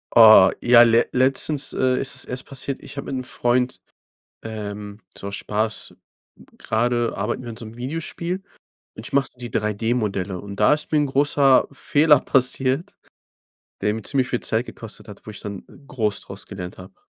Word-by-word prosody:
Oh 110 -4 +9
ja, 120 0 +7
le 115 0 +4
letztens, 135 +2 0
äh, 130 -1 +1
ist 135 - -4
es - - -6
erst 125 +1 -6
passiert. 135 0 -5
Ich 145 - -11
hab 140 - -4
mit - - -5
'nem 130 - -3
Freund, 125 +1 0 0.6
ähm, 105 -1 -7 0.2
so 100 - -6
Spaß 105 +2 -3 0.6
gerade 120 +1 0
arbeiten - - -2
wir 120 - -7
an 115 - -8
so 115 - -8
'nem 110 +1 -11
Videospiel 165 +7 -4 0.5
und - - -9
ich - - -11
mache 140 -1 +2
so - - -33
die 120 -1 -7
3D-Modelle 105 -3 -1
und 100 +1 -8
da - - +4
ist 150 - -6
mir 155 - +4
'n 145 - +2
großer 140 -1 +3
Fehler 150 0 +4
passiert 130 +4 0 0.9
der 105 - +1
mir 110 +1 -5
ziemlich 130 +2 0
viel 125 - -1
Zeit 110 +2 -1
gekostet 115 -3 -11
hat, 105 - -12
wo - - -6
ich 105 - -9
dann 100 -2 -6 0.2
groß 110 -6 -2
draus 100 - -9
gelernt 90 -3 -8
hab. 95 0 -14
120 Hz, 180 wpm, -22 LUFS, 105-135 Hz, 0.9 s, Oh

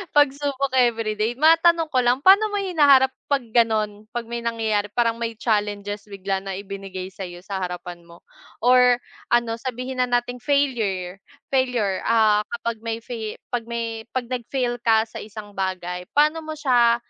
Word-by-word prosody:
Pagsubok 280 -1 +2
everyday 225 -2 +1
matanong 330 +2 +4
ko 255 - +3
lang 245 +3 +2
paano 400 +3 +7
mo 410 - -2
hinaharap 285 -8 +4 0.2
pag 280 -3 +1
ganon? 215 -2 +1
Pag 235 -1 -4
may 235 - -2
nangyayari 225 -3 -1
parang 230 -1 +1
may 230 -1 -3
challenges 205 -2 -2
bigla 195 -1 -3
na 195 0 -6
ibinigay 195 -1 -7
sayo 180 -2 -8
sa 195 -1 -4
harapan 180 -1 -5
mo 170 0 -16 0.4
or 250 0 +6 0.3
ano 235 -1 +1
sabihin 255 +1 -5
na 250 - +2
nating 245 0 -1
failure, 225 -10 0 0.3
failure, 250 -7 +1
ah, 220 -2 +4
kapag 235 -1 -4
may 225 0 -5
fail 225 -3 -5 0.2
pag 235 -2 -2
may 230 -1 -4
pag 255 - 0
nag 245 -3 -3
fail 245 -3 -1
ka 220 -1 +3
sa 225 - -9
isang 210 -1 -9
bagay. 180 -2 -4
Paano 305 +2 +4
mo 315 -1 -6
siya, 245 -5 +4
230 Hz, 160 wpm, -23 LUFS, 205-255 Hz, 0.4 s, paano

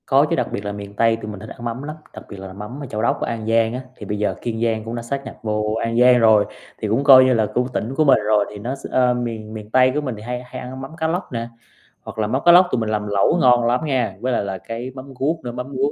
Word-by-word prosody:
Có - - +4
chứ, - - +1
đặc - - 0
biệt 100 - -4
là 100 - -2
miền 100 0 -8
Tây 115 +1 +3
tụi 105 - -6
mình 105 - -8
thích 110 +2 -10
ăn 120 - -9
mắm 120 +3 -4
lắm, 150 +1 -6 0.2
đặc - - -10
biệt 100 - -9
là 95 -1 -8
mắm 105 +7 -8
ở - - -4
Châu 110 -4 -4
Đốc, 115 - 0
An 115 -2 -3
Giang 115 0 +2
á, 125 - -4
thì 105 - -9
bây 105 +1 -3
giờ 105 - 0
Kiên 115 -1 -3
Giang 110 -2 0
cũng 115 +2 -5
đã 120 - -4
sáp 140 +4 -4
nhập - - -8
vô 105 0 -1
An 115 +1 0
Giang 125 0 +6
rồi, 110 -2 +5 0.3
thì 110 - -3
cũng 115 +7 +1
coi 135 -2 +9
như 130 - +4
là 110 -2 +2
cũng 125 +1 +1
tỉnh 120 +5 -3
của 155 - +3
mình 140 - +6
rồi. 105 -1 +3
Thì 105 - -9
nó 120 +6 -3
x 135 - -12
ơ, 125 -1 +3
miền 115 -3 -4
miền 105 -1 -8
Tây 130 +1 +5
của 150 - +1
mình 130 -5 -4
thì - - -10
hay 125 +2 -5
hay 125 0 -8
ăn 130 +1 -7
mắm 135 - -8
cá 160 -1 0
lóc 175 +4 -3
nè, 115 -1 -3 0.5
hoặc - - -10
là 105 - +1
mắm 130 +5 -1
cá 175 - +9
lóc 180 +1 +7
tụi - - +1
mình 110 - -2
làm 105 -1 -1
lẩu 100 - +2
ngon 120 -1 +5
lắm 125 +6 +1
nha, 125 -9 0
với 125 +2 -1
lại - - 0
là 95 -1 -4
cái 115 +5 -6
mắm 135 +1 -9
ruốc 155 +5 0
nữa, 120 - -4
mắm 125 +1 -5
ruốc 140 +2 +1
120 Hz, 315 wpm, -21 LUFS, 110-130 Hz, 0.5 s, coi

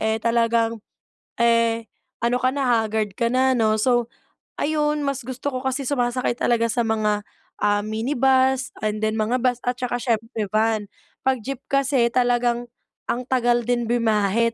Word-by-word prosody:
eh, 220 0 +1
talagang 230 0 +1 0.6
eh, 230 -1 +2 0.3
ano 235 +1 +1
ka 255 - +3
na, 275 -1 -1 0.2
haggard 215 -2 -2
ka 235 -1 0
na 260 0 +3
'no. 220 -2 +2
So 240 0 +1 0.4
ayun, 300 -1 0
mas 275 -3 -3
gusto 260 +2 -4
ko 255 - -3
kasi 265 +1 -2
sumasakay 245 -3 0
talaga 230 -1 +2
sa 235 -2 0
mga, 210 -2 0 0.4
ah, 205 0 +1
minibus 260 +3 +1
and 215 0 -1
then 215 0 +1
mga 235 +4 0
bus 250 -1 +2
at 245 - +1
saka 245 -1 -2
siyempre 225 -2 -2
van. 215 -1 +1 0.4
'Pag 260 -5 +1
jeep 270 -1 -4
kasi 275 -3 +2
talagang 240 -1 +1 0.4
ang 250 +1 -1
tagal 240 -2 +1
din 240 -1 0
bumiyahe. 230 -1 +2
235 Hz, 155 wpm, -23 LUFS, 220-255 Hz, 0.6 s, ka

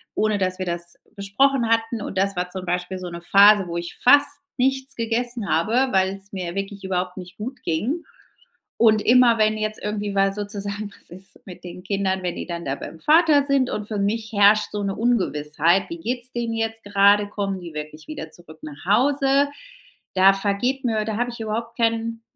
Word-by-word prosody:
ohne 215 -1 +1
dass 185 -1 -2
wir 185 - -2
das 170 0 -5 0.2
besprochen 235 +5 +1
hatten. 225 0 0
Und 195 - -6
das 195 0 +1
war 180 0 -2
zum 185 0 -7
Beispiel 180 +1 -2
so 180 -1 -6
'ne 170 0 -8
Phase, 200 +1 +6
wo 170 0 -4
ich 170 0 -5
fast 285 +2 +5 0.2
nichts 265 +1 0
gegessen 230 -2 -2
habe, 235 +11 +1
weil's 195 +1 0
mir 180 -1 -5
wirklich 195 0 -5
überhaupt 180 -1 -2
nicht 180 0 -10
gut 250 +5 -7
ging. 220 - -2 0.8
Und 220 -2 +5
immer, 240 -1 +5
wenn 215 0 +2
jetzt 215 0 -3
irgendwie 210 -1 -3
weil 195 0 +2
sozusagen 205 0 -5
was - - -13
ist 190 +2 -8
mit 180 -1 -11
den 180 +1 -9
Kindern, 190 -1 -1
wenn 175 -1 -3
die - - -5
dann 170 -1 -6
da 135 - -1
beim 160 +3 -9
Vater 305 -2 +4
sind 275 -3 +1
und 210 0 -4
für 210 -2 -3
mich 215 +3 -1
herrscht 205 +1 +4
so 205 -1 -3
'ne 195 -1 -2
Ungewissheit: 175 -6 +1
„Wie 335 0 -6
geht's 250 -2 -3
den 235 -1 -3
jetzt 225 -1 -3
gerade? 205 0 +4
Kommen 195 -2 -3
die 170 -2 -9
wirklich 150 0 -8
wieder 155 +1 -7
zurück 160 -2 -15
nach 150 0 -10
Hause?“ 275 - +3 0.7
Da 190 +1 +6
vergeht 215 +7 -1
mir 220 -3 0
da 220 - -2
habe 245 +2 -1
ich 235 - -10
überhaupt 230 +2 -4
keinen 230 0 0
205 Hz, 195 wpm, -22 LUFS, 185-230 Hz, 0.8 s, Phase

